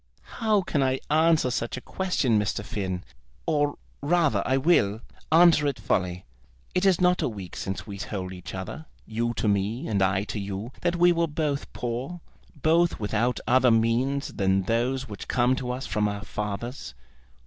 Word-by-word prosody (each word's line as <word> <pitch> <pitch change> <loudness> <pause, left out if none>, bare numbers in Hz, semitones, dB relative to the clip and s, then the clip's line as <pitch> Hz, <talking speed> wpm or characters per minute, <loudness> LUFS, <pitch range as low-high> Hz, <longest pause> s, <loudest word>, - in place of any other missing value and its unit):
"How 215 -3 +3
can 150 -4 0
I 130 0 +1
answer 160 -4 +4
such 120 0 -2
a - - -3
question, 135 - 0
Mr. 105 0 -2
Finn? 95 -4 -3 0.4
Or, 145 -1 +1 0.2
rather, 150 - +2
I 130 - +3
will, 125 -8 +3 0.3
answer 160 -2 +6
it 140 - -1
fully. 90 -3 -1 0.5
It 180 +2 +2
is 185 -3 +4
not 180 0 +3
a - - +1
week 100 -5 -8
since 95 0 -4
we 100 -2 -8
told 95 -3 -4
each 90 +1 -8
other, 95 +12 -6 0.2
you 120 +1 -2
to 110 - -1
me 105 +7 0
and 100 -3 0
I 95 +1 +2
to 105 - -5
you, 100 +4 -5
that 175 0 +1
we 175 +1 +5
were 170 -1 +1
both 150 -2 -2
poor, 125 +8 -4 0.4
both 170 +2 +3
without 110 +3 0
other 130 0 +4
means 120 +5 +2
than 95 0 +1
those 125 +5 0
which 105 -3 -8
come 125 +1 +2
to 125 - -4
us 125 +2 -3
from 105 +1 0
our 100 -1 -4
fathers. 105 - -5
120 Hz, 175 wpm, -26 LUFS, 100-150 Hz, 0.5 s, answer